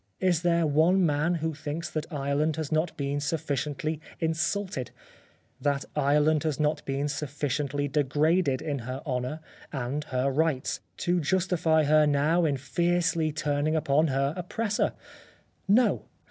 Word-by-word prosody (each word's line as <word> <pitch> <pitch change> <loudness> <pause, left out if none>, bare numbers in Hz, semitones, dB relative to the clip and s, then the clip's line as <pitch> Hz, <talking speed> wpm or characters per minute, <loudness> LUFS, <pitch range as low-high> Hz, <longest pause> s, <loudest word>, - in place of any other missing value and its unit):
Is 180 -3 +2
there 170 -1 +2
one 165 +5 +4
man 160 +3 +1
that 160 -2 -2
thinks 155 +3 -4
that 155 +2 -4
Ireland 145 +1 0
has 155 -1 -4
not 155 +2 0
been 140 0 -1
sufficiently 150 0 -2 0.2
insulted, 160 - -1 0.7
that 140 -1 0
Ireland 150 +1 +3
has 155 -4 -2
not 150 0 +1
been 140 +1 -1
sufficiently 145 0 -2
degraded 145 +1 +1
in 145 -3 -2
her 130 +3 -6
honour 130 +2 -2 0.3
and 135 +2 -3
her 130 +1 0
rights, 150 -2 0 0.3
to 175 0 +2
justify 165 -1 +2
her 150 +1 +4
now 150 +4 +2
in 145 -3 +1
fiercely 170 +2 +1
turning 150 0 0
upon 155 0 +2
her 140 +1 0
oppressor? 210 +4 -1 0.7
No 230 +6 +3
150 Hz, 135 wpm, -27 LUFS, 140-160 Hz, 0.7 s, one